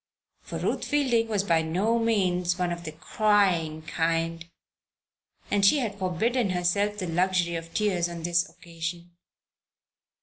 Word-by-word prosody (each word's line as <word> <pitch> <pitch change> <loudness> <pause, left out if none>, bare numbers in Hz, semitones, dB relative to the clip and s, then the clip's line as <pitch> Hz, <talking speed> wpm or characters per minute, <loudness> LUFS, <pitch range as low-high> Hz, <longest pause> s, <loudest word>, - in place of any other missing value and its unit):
For - - -6
Ruth - - -1
Fielding 255 -6 +1
was 210 -3 0
by 165 -4 +2
no 190 +9 0
means 180 -6 +1
one 180 -1 0
of 170 0 -5
the 155 - -4
"crying 165 -2 +1
kind," 165 +1 -1 1.0
and 205 -1 +2
she 200 +10 +6
had 220 -7 -3
forbidden 200 +6 0
herself 185 +4 0
the 190 - -3
luxury 175 0 +1
of 165 0 -5
tears 185 -5 0
on 170 -1 -7
this 175 +2 +1
occasion. 170 +1 -7
180 Hz, 140 wpm, -27 LUFS, 170-205 Hz, 1.0 s, she